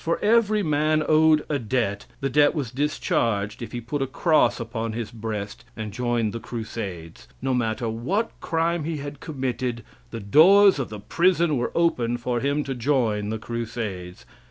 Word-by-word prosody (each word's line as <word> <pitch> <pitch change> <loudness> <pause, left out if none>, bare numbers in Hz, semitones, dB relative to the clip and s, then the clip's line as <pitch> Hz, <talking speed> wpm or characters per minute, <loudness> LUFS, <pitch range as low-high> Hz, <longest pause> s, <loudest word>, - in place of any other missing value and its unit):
For 165 - 0
every 215 -1 +3
man 155 0 +2
owed 155 -1 +4
a 145 -2 -1
debt, 115 -4 -2
the 135 - 0
debt 145 +4 +4
was 135 -7 -3
discharged 115 -7 -1
if 115 - -6
he 120 - -4
put 125 +5 -4
a 135 - 0
cross 155 +3 +2
upon 115 -1 -4
his 115 0 -4
breast 110 -3 -5
and 110 -1 -5
joined 120 -2 -1
the 115 - -4
Crusades. 100 - -7
No 130 0 -1
matter 115 -1 -1
what 160 - -1
crime 165 0 0
he 160 0 -3
had 145 0 -7
committed 125 -4 -3 0.3
the 115 - -6
doors 180 - +6
of 135 - -3
the 105 -1 -7
prison 170 - +2
were 120 -1 -1
open 120 -9 +1
for 120 0 -2
him 140 +3 0
to 135 - -4
join 115 -5 0
the 110 - -2
Crusades. 110 -6 -5
125 Hz, 175 wpm, -24 LUFS, 110-155 Hz, 0.3 s, doors